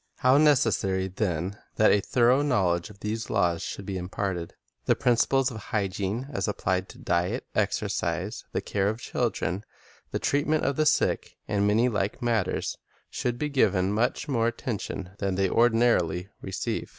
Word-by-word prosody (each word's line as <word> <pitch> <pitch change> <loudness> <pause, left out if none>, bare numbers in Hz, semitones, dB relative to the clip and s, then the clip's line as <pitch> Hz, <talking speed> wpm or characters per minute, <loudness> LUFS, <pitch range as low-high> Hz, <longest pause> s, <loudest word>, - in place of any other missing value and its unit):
How 130 +2 +4
necessary, 105 -10 +3
then, 95 0 -2 0.2
that 110 - +5
a 105 - +4
thorough 125 +5 +3
knowledge 90 - +1
of 100 -2 -15
these 110 +2 -3
laws 85 -5 +1
should 100 - -5
be 95 -1 -3
imparted! 90 -1 -3 0.3
The - - +3
principles 125 +2 +2
of 115 - -7
hygiene 105 +2 -2
as - - -1
applied 95 -3 -1
to - - -12
diet, 85 +1 -1
exercise, - - -1
the - - -1
care 100 -1 0
of 110 +2 -3
chil - - 0
dren, 95 +5 -3 0.5
the - - -2
treatment 150 +2 +1
of 140 +1 +1
the 155 +1 +2
sick, - - +1
and 100 0 +1
many 110 +4 +3
like 100 -4 -1
matters, 115 -5 -1 0.3
should 120 -1 -2
be 150 +3 -2
given 100 -8 +2
much 120 +7 0
more 115 -5 +1
attention 105 -6 -4
than 100 -2 -1
they 95 0 +1
ordi 115 +2 +4
narily 95 -6 +2
receive. 95 -1 -3
105 Hz, 165 wpm, -27 LUFS, 95-120 Hz, 0.5 s, that